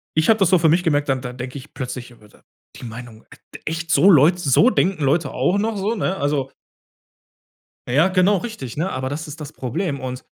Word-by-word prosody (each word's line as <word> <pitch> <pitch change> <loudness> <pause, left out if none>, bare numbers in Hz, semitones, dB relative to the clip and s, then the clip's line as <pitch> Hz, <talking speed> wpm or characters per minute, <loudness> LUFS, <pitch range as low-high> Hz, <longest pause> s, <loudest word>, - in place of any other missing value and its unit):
ich 160 +6 +2
habe 220 - +5
das 195 -3 +3
so 185 - +4
für 165 -1 +3
mich 170 +3 +3
gemerkt, 145 -4 +1
dann 130 -1 0
dann 125 -1 -7
denke 125 +2 -6
ich 140 +2 -12
plötzlich 125 -2 -6
über 110 -3 -18
da - - -23 0.4
die - - -12
Meinung: 115 -1 -10 0.3
„D - - -9
echt, 165 +1 -4
so 195 - +5
Leute 160 +4 +5
so 165 - +4
denken 190 -8 0
Leute 140 +1 +1
auch 185 - +1
noch“, 220 +1 -1
so, 205 +4 -1
ne? 190 -2 -2
Also 140 -2 -1 1.4
Ja, 145 +9 +3
genau 185 +2 +3
richtig, 180 - -7
ne? 170 +6 -1
Aber 130 -4 -3
das 150 +4 -5
ist 155 +2 -10
das 150 0 -8
Problem. 140 - -3
Und 130 0 -6
150 Hz, 220 wpm, -21 LUFS, 130-180 Hz, 1.4 s, habe